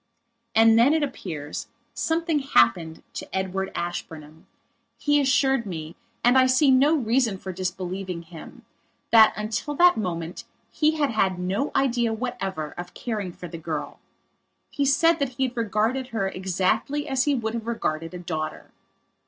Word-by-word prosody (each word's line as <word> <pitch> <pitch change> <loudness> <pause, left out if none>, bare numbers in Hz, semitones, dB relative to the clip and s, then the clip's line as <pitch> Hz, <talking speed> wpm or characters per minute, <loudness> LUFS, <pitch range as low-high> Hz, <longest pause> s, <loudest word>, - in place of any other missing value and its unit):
And 225 0 +6
then, 275 +7 +5
it 315 - +1
appears, 160 - -5 0.3
something 325 -1 0
happened 160 - +2
to - - -7
Edward 190 0 -2
Ashburnham. 160 -3 -6 0.5
He 290 0 +2
assured 270 -1 +2
meand 160 -3 -6 0.3
I 255 +2 +5
see 260 +2 +4
no 280 +5 +5
reason 235 -5 +1
for 190 0 -7
disbelieving 185 -1 -4
himthat 180 +6 +1
until 220 +7 -3
that 355 +3 +5
moment 170 -4 -4 0.3
he 310 0 +2
had 290 -4 +1
had 190 -4 +1
no 190 +10 -1
idea 240 -4 +1
whatever 195 -10 -4
of 175 0 -8
caring 210 -6 -4
for 175 - -9
the 165 -1 -8
girl. 155 -2 -5 0.7
He 285 - 0
said 330 +4 +4
that 275 -3 -1
he 265 - +1
had 245 - -21
regarded 230 +3 0
her 220 -6 -2
exactly 190 +10 -1
as 265 -1 +1
he 290 -1 +2
would 220 -3 -2
have 230 -1 -5
regarded 165 -7 -2
a - - -4
daughter. 160 -3 -5
220 Hz, 150 wpm, -25 LUFS, 180-265 Hz, 0.7 s, And